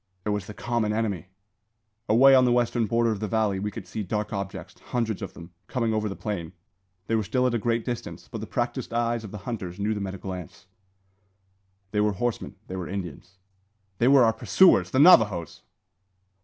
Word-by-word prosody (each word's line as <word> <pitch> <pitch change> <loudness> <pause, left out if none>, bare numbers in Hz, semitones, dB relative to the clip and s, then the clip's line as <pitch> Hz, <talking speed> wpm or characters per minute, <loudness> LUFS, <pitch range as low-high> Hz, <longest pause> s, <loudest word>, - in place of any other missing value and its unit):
It - - -1
was 105 -2 -2
the 105 - -9
common 115 -2 -1
enemy! 105 -6 -2 0.8
Away 130 +5 +7
on 130 -1 +7
the 125 - +3
western 120 -1 +1
border 115 +1 +2
of 105 - -3
the 110 - -2
valley 105 -3 0
we 105 +2 -2
could - - -8
see 110 - -5
dark 105 +2 -3
objects, 100 -1 -6
hundreds 115 -4 -2
of - - -7
them, 85 0 -11 0.2
coming 115 -4 -1
over 110 -1 -1
the 100 - -5
plain. 90 -6 -5 0.5
They 115 - -3
were 110 - +3
still 115 +5 0
at 125 - +1
a 120 - +1
great 115 +1 -1
distance, 120 -2 -5
but - - -7
the - - -6
practised - - -3
eyes 115 -1 0
of 105 - -7
the 105 - -7
hunters 95 -7 -5
knew 105 +2 0
them 100 -2 -3
at 95 - -5
a - - -7
glance. 90 -4 -8 1.3
They 105 - +1
were 105 0 +2
horsemen; 115 0 -3
they 95 - -7
were 90 -3 -4
Indians; 95 0 -7 0.6
they 120 - +3
were 135 -1 +7
our 115 -1 +4
pursuers, 190 +10 +4
the - - -1
Navajoes! 105 - +5
110 Hz, 205 wpm, -26 LUFS, 100-120 Hz, 1.3 s, Away